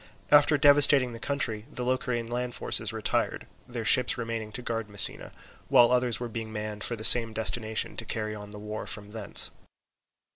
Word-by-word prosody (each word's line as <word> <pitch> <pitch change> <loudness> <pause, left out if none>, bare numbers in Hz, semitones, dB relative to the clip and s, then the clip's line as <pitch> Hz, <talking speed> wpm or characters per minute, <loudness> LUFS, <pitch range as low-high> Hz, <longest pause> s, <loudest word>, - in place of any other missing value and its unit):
After 150 0 +4
devastating 145 -3 +4
the 115 - -10
country 115 -6 -4
the 125 - -6
Locrian 125 -2 -3
land 120 +1 -5
forces - - -2
retired, - - -3 0.2
their 120 -2 -7
ships 125 +3 +3
remaining 115 -2 -6
to 125 - -7
guard 115 -2 -5
Messina, 100 -1 +5 0.4
while 120 0 +3
others 125 -2 0
were 120 - -6
being 115 -1 -8
manned 105 -1 -7
for 120 - -3
the 110 - -11
same 115 -1 +7
destination 110 0 -3
to - - -4
carry 110 -1 -5
on 105 -1 -11
the 105 - -12
war 105 +1 -8
from 105 -1 -7
thence. 110 -3 0
115 Hz, 180 wpm, -26 LUFS, 110-125 Hz, 0.4 s, same